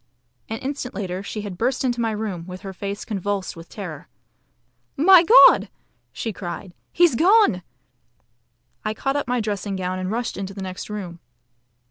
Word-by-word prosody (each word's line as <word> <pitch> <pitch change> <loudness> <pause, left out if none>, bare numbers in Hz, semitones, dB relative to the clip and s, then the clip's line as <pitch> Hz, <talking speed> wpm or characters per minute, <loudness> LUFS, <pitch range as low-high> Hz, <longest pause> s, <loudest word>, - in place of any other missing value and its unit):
An 225 - -3
instant 265 -2 -5
later 190 -2 -3
she 210 +2 -5
had 200 -4 -7
burst 255 +4 0
into 245 -2 0
my 225 - +1
room, 210 -6 -4
with 185 0 -8
her 195 -1 -7
face 200 +2 -5
convulsed 200 -1 -3
with 165 0 -12
terror. 180 -6 -8 0.9
"My 355 +5 +8
God!" 455 +8 +7 0.4
she 225 - -4
cried, 175 0 -7 0.2
"he's 345 -4 +4
gone!" 365 - +4 1.2
I 215 - -2
caught 270 +3 -1
up 285 -3 -1
my 250 0 0
dressing 205 -2 -3
gown 185 0 -3
and 185 0 -3
rushed 235 +3 -2
into 195 0 -5
the 195 - -6
next 185 +1 -6
room. 185 -5 -6
205 Hz, 165 wpm, -23 LUFS, 185-245 Hz, 1.2 s, My